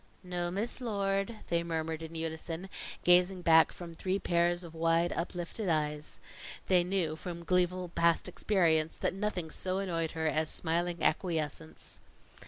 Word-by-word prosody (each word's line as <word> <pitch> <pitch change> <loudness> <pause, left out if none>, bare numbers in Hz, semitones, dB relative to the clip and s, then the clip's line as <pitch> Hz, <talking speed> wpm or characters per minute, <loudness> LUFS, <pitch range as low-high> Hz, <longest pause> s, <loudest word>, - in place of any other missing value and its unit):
"No, 175 -1 -2
Miss 210 +8 -2
Lord," 200 -1 -1
they 170 0 +2
murmured 160 -1 -3
in 165 0 -8
unison, 165 +3 -4 0.3
gazing 180 +1 +4
back 160 -1 +6
from 170 -2 -9
three 185 +3 -1
pairs 175 -1 +1
of 165 -2 -10
wide, 165 +1 +2
uplifted 175 +4 -3
eyes. 150 -1 -1 0.5
They 180 -2 +4
knew, 175 -4 0
from 170 +1 -7
gleeful 180 0 +1
past 170 +1 +2
experience, 170 -4 +2
that - - 0
nothing 190 -5 -2
so 185 +3 -1
annoyed 170 -4 -1
her 160 -1 -2
as 155 0 +1
smiling 175 +1 -1
acquiescence. 150 - -2
170 Hz, 145 wpm, -31 LUFS, 160-185 Hz, 0.5 s, back